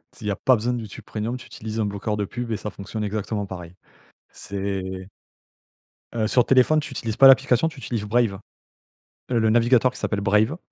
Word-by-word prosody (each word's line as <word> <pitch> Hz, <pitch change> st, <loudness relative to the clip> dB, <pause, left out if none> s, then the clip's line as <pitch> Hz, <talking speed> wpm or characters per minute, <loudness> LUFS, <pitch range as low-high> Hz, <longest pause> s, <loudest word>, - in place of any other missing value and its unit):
Si -, -, -13 dB
il -, -, -2 dB
y -, -, +1 dB
a -, -, -1 dB
pas 130 Hz, -, +3 dB
besoin 120 Hz, +2 st, -1 dB
de 120 Hz, -, -2 dB
YouTube 105 Hz, -3 st, -9 dB
premium, 115 Hz, +3 st, -4 dB
tu 125 Hz, -, -12 dB
utilises 110 Hz, +1 st, -6 dB
un 110 Hz, -, +1 dB
bloqueur 100 Hz, +1 st, -2 dB
de 105 Hz, -, -1 dB
pubs 120 Hz, +3 st, -5 dB
et 110 Hz, -, 0 dB
ça 105 Hz, -, -5 dB
fonctionne 105 Hz, +2 st, -6 dB
exactement 105 Hz, 0 st, -2 dB
pareil. 90 Hz, -2 st, -9 dB, 0.6 s
C'est 95 Hz, -2 st, -5 dB, 1.1 s
Heu, 110 Hz, -2 st, +1 dB
sur 125 Hz, +2 st, +3 dB
téléphone, 135 Hz, +4 st, +4 dB
tu 150 Hz, -, -6 dB
utilises 115 Hz, -4 st, -4 dB
pas 135 Hz, -, +9 dB
l'application, 130 Hz, +2 st, +5 dB
tu 155 Hz, -4 st, -8 dB
utilises 115 Hz, -5 st, -3 dB
Brave. 105 Hz, -3 st, +1 dB, 0.9 s
Heu, 120 Hz, -, +2 dB
le 110 Hz, -1 st, +2 dB
navigateur 120 Hz, +2 st, +4 dB
qui 125 Hz, -, -9 dB
s'appelle 100 Hz, -, -1 dB
Brave, 105 Hz, +8 st, +2 dB
110 Hz, 205 wpm, -23 LUFS, 100-125 Hz, 1.1 s, pas